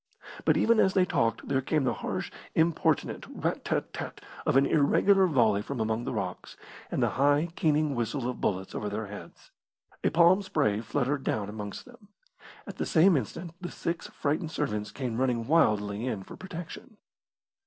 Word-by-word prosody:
But - - +4
even 230 -1 +4
as 190 - +3
they 185 -2 +5
talked 115 -9 0
there 135 -1 +1
came 150 +2 0
the 125 - +1
harsh, - - -4 0.2
importunate 165 0 +1
rat - - -3
tat - - -2
tat - - -6 0.3
of - - +4
an 135 - +5
irregular 190 +7 +4
volley 115 - +3
from 130 +4 -5
among 110 +2 -1
the - - -2
rocks, 100 -6 -5 0.3
and - - 0
the - - +3
high, 145 +4 +3
keening 155 -2 +2
whistle 120 +1 -2
of 125 - -4
bullets 95 -1 -1
over 105 - -3
their 105 +1 -3
heads. 105 0 -11 0.5
A - - +3
palm 175 +4 +5
spray 150 - 0
fluttered 135 +3 -1
down 105 -2 -1
amongst 105 -1 -7
them. 240 -4 -17 0.6
At - - -9
the - - -1
same 175 +2 +5
instant 155 - -3
the 175 - -4
six 170 0 -4
frightened 155 +3 -2
servants 105 -9 -2
came 125 -4 -4
running 125 -3 +1
wildly 105 -7 +2
in 105 -6 -3
for - - -11
protection. 185 +3 -9
140 Hz, 175 wpm, -28 LUFS, 110-165 Hz, 0.6 s, they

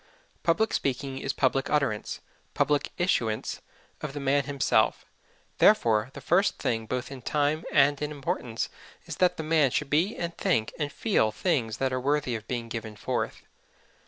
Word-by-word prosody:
Public 180 +6 +2
speaking 135 0 -1
is 135 - -1
public 135 0 +1
utterance, 140 -8 0 0.3
public 145 -1 +2
issuance, 115 - 0 0.4
of 150 -2 -4
the 145 - -4
man 140 0 +2
himself; 140 -1 +1 0.5
therefore 110 0 +4
the - - -9
first 190 +4 +2
thing 115 -1 -1
both 125 +2 -3
in 135 -2 -8
time 150 +4 0
and 145 0 +4
in 150 - -1
importance 130 -5 -3 0.4
is - - -6
that 180 -1 +3
the 160 - -3
man 155 -3 +3
should 140 +3 -2
be 170 +9 +2
and 170 -1 -3
think 115 - 0
and 145 -2 -1
feel 165 - +1
things 115 -2 0
that 130 -1 0
are 130 - -1
worthy 145 -1 +1
of 110 0 -7
being 120 -2 -3
given 110 -1 -6
forth. - - -3
140 Hz, 165 wpm, -27 LUFS, 120-150 Hz, 0.5 s, therefore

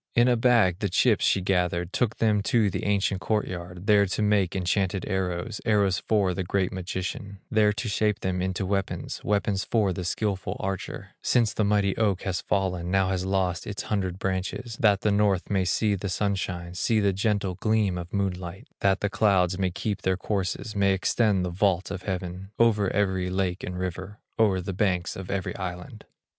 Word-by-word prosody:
In 120 +1 +5
a 125 - +4
bag 115 -7 +3
the 100 - -1
chips 105 +4 +3
she 95 - +3
gathered, 90 -1 0
Took 120 -3 0
them 105 -2 +2
to 110 -4 +3
the - - -3
ancient 100 -2 +1
court 105 +2 0
yard, 90 0 -7
There 100 -1 +5
to 95 - -2
make 105 -4 +2
enchanted 95 +1 0
arrows, 95 +3 -2
Arrows 100 -5 +2
for 100 -4 +1
the 95 - -2
great 95 +1 0
magician, 95 +2 -5
There 110 -1 +4
to 110 +3 -4
shape 105 0 0
them 90 -1 -1
into 95 +1 -1
weapons, 95 0 -2
Weapons 100 -1 0
for 105 -5 +1
the 90 - -4
skilful 95 +2 -2
archer, 95 -1 -4
Since 120 -4 +2
the 110 - 0
mighty 100 -1 +2
oak 100 -4 +1
has 90 -5 -2
fallen, 90 -2 -1
Now 95 0 +2
has 95 -1 -1
lost 95 -2 0
its 105 - -4
hundred 95 -4 -2
branches, 95 +5 -3
That 100 -3 +4
the 105 - +2
North 100 -2 +1
may 95 -2 +2
see 105 +3 +1
the 100 0 -3
sunshine, 95 -3 -2
See 110 +5 +1
the 100 -2 +2
gentle 100 -1 0
gleam 105 0 +1
of 85 0 -8
moonlight, 95 -3 -3
That 100 0 +2
the 105 - 0
clouds 95 -4 +2
may 95 -1 +1
keep 100 +3 -3
their 95 -1 +1
courses, 100 +2 -3
May 100 -1 +3
extend 95 0 +1
the 90 - -3
vault 95 0 +1
of 95 -2 -4
heaven 95 0 -5
Over 105 -4 +3
every 95 -2 0
lake 95 0 -1
and 90 0 -4
river, 90 +2 -5 0.2
O'er 100 -4 +3
the 95 +2 -4
banks 90 -2 0
of 95 -1 -7
every 100 -1 -2
island. 95 +5 -6
95 Hz, 190 wpm, -26 LUFS, 90-105 Hz, 0.2 s, In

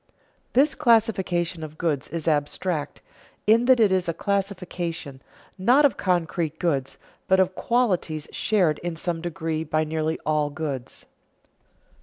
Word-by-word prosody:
_This 280 +3 +4
classification 190 - +2
of 155 0 -8
goods 155 -6 -1
is 165 0 -5
abstract, 150 +1 -1 0.4
in 225 +3 +4
that 255 -1 +5
it 215 -4 +4
is 185 -2 +1
a 165 - -2
classification, 180 -8 -3 0.4
not 250 +10 +5
of 280 - +3
concrete 170 -3 -1
goods, 140 -7 -1 0.3
but 190 0 +4
of 185 0 +2
qualities 185 -11 0
shared 180 -8 +1
in 175 -1 -4
some 165 0 -3
degree 160 -2 -3
by 155 0 0
nearly 155 0 -1
all 150 -1 +1
goods. 140 -4 -6
170 Hz, 135 wpm, -24 LUFS, 155-195 Hz, 0.4 s, that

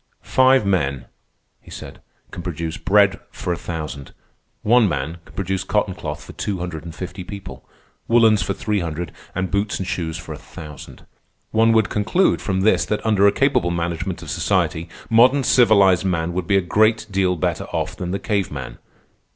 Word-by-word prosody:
"Five 130 -3 +4
men," 70 -10 0 0.6
he - - -17
said, - - -10 0.3
"can - - -6
produce 80 -1 -4
bread 100 -1 +3
for 90 - -3
a - - -2
thousand. 75 -5 -6 0.5
One 115 -1 +5
man 75 +2 -3
can - - -18
produce 95 -1 -2
cotton - - 0
cloth - - -6
for - - -11
two 100 -2 -3
hundred 90 -4 -5
and 80 -1 -8
fifty 95 +1 -6
people, 100 +1 -9 0.4
woollens 115 -3 +5
for 95 +3 -2
three 105 -2 -1
hundred, 85 -1 -4 0.2
and 95 0 -2
boots 100 +1 0
and 95 - -4
shoes 85 -3 -3
for 80 0 -7
a 75 - -9
thousand. 75 -2 -11 0.5
One 115 +1 +4
would 110 -2 +3
conclude 110 - +1
from 95 -2 -1
this 110 +3 +3
that 105 - -2
under 105 -2 +4
a - - +5
capable 135 -7 +2
management 85 +1 -3
of - - -6
society 85 +1 0 0.2
modern 125 +5 +5
civilized 100 -8 +5
man 85 -2 -1
would 90 -1 -3
be 100 0 +4
a - - +3
great 110 +5 +2
deal 95 -1 +1
better 80 - -1
off - - -3
than 90 - -5
the 95 - -1
cave 100 -2 -1
man. - - -7
95 Hz, 185 wpm, -21 LUFS, 85-105 Hz, 0.6 s, One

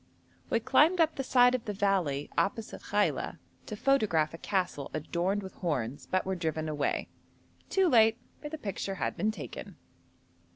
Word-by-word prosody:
We - - +2
climbed 340 +4 +4
up 325 -1 +4
the 270 - -3
side 250 -1 +5
of 255 -3 -2
the 210 - -3
valley 190 -9 0
opposite 220 +3 -1
Khaila - - 0 0.3
to 215 - -4
photograph 205 - +2
a 165 - -8
castle 185 -9 -1
adorned 175 +6 -1
with 190 - -8
horns, 140 -7 -3
but 185 - 0
were 190 - -1
driven 160 -3 -2
away; 150 -2 -1 0.6
too 385 -1 +3
late, 225 -6 +5 0.2
for 295 - -6
the 315 - -5
picture 200 -5 -4
had - - -2
been 215 - 0
taken. 210 -8 -7
195 Hz, 165 wpm, -30 LUFS, 160-235 Hz, 0.6 s, side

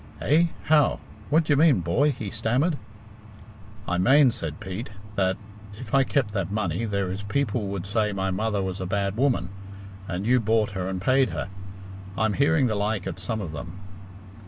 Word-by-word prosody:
"Eh? 160 +4 +4 0.2
How? 150 -1 +3 0.3
What 160 +3 +4
d'ye 150 -2 +2
mean, 145 - +5
boy?" 120 - +2
he 110 -6 -6
stammered. 125 +9 +1 1.1
"I 90 0 0
mane," 135 +6 +6
said 80 -7 -5
Pete, 95 +5 -6 0.2
"that 95 -2 +1 0.4
if 120 - -9
I 135 0 +5
kept 135 -5 0
that 100 -3 -2
money 105 0 -1
there 100 -3 -1
is 95 +2 -4
people 105 0 -1
would 95 -2 -4
say 105 +1 0
my 95 -1 -1
mother 105 +1 -1
was 95 0 -4
a 95 - -3
bad 100 +1 -1
woman, 120 -8 +1 0.6
and 90 +2 -3
you 125 +2 +4
bought 110 -1 +1
her 95 -2 -3
and 95 -1 -3
paid 130 +6 +3
her - - -4 0.7
I'm 110 0 +1
hearing 145 +2 +3
the 115 - +1
like 105 -1 -1
at - - -5
some 110 -2 -3
of 85 -6 -5
them." 85 +4 -8
105 Hz, 180 wpm, -25 LUFS, 95-130 Hz, 1.1 s, mane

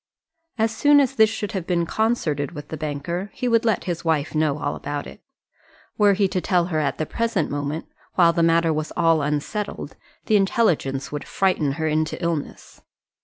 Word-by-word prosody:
As 225 0 0
soon 290 +4 +5
as 270 -2 +2
this 220 -4 +5
should 210 -1 -4
have 190 -6 -4
been 170 -2 +1
concerted 170 - -1
with 145 -2 -9
the - - -4
banker, 155 +5 -4
he 250 - -2
would 230 -1 +3
let 225 -3 +1
his 175 -2 -4
wife 160 -3 0
know 155 -2 +1
all - - -2
about 145 0 -4
it. - - -12 0.7
Were 205 -1 +4
he 195 0 +2
to 185 - -1
tell 180 -3 +2
her 155 - +2
at 145 -2 -1
the 155 - -1
present 225 -4 -1
moment, 145 +2 -3 0.3
while 170 -2 +5
the 170 - +1
matter 165 0 +3
was 155 0 -3
all 165 -1 +3
unsettled, 150 +9 -3 0.3
the 215 - +4
intelligence 160 - +1
would 145 0 -5
frighten 175 -7 +1
her 160 +2 -2
into 155 0 0
illness. 170 -4 -4
170 Hz, 190 wpm, -23 LUFS, 150-205 Hz, 0.7 s, soon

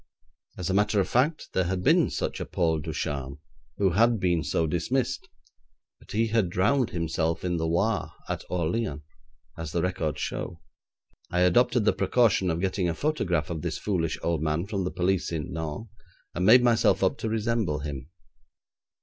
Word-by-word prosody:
As 90 - -3
a 95 - 0
matter 105 +1 +2
of 95 - +1
fact 150 +6 +1
there 95 - +1
had 90 +1 -2
been - - +4
such - - -3
a - - -3
Paul 80 -3 +1
Ducharme, 70 -2 -4 0.4
who 95 -2 +2
had 115 +4 +3
been 85 -3 +1
so 80 - 0
dismissed, 105 - -1 0.7
but - - -13
he 115 +2 +1
had 110 -5 +2
drowned 115 +8 +2
himself 85 -3 -1
in 90 -1 0
the 80 0 -1
Loire, 100 +7 0 0.2
at - - -3
Orleans, 85 -2 -1 0.6
as 80 -3 -5
the 85 - 0
records 80 -4 -2
show. 85 -3 -4 0.7
I 90 - 0
adopted 120 +5 +3
the - - +4
precaution 100 -2 +2
of 85 0 -1
getting 95 -2 0
a 85 - -2
photograph 90 - -1
of 80 -2 -3
this - - -3
foolish 85 -6 -1
old 85 -2 0
man 80 +3 0
from 100 -3 -2
the 90 - -2
police 90 0 0
at 80 -3 -2
Nantes, 80 +7 -5 0.5
and 90 +2 0
made 125 +3 +8
myself 115 -5 +3
up 95 - +1
to 110 - -2
resemble 110 -8 0
him. 70 -1 -6
90 Hz, 175 wpm, -27 LUFS, 80-110 Hz, 0.7 s, made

